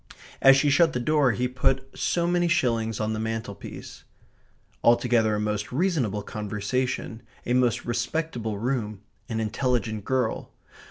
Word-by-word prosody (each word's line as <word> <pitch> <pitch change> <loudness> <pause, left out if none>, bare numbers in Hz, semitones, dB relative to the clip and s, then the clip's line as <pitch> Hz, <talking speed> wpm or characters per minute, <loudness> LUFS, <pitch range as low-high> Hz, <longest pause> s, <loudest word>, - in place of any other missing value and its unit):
As 135 0 +8
she 145 +1 +3
shut 160 +3 +4
the 125 - -1
door 140 0 +2
he 125 +4 0
put 130 +1 0
so 170 -1 0
many 175 0 +2
shillings 115 -10 0
on 110 0 -1
the 110 - -3
mantelpiece. 110 -2 -6 0.8
Altogether 120 -2 +3
a - - -1
most 105 0 -2
reasonable 130 - 0
conversation; 110 +3 -3 0.2
a 120 - 0
most 125 -2 +2
respectable 120 -2 -2
room; 110 -3 -2 0.3
an 115 -1 -2
intelligent 110 -1 -1
girl. 125 -1 -1
120 Hz, 140 wpm, -26 LUFS, 110-135 Hz, 0.8 s, As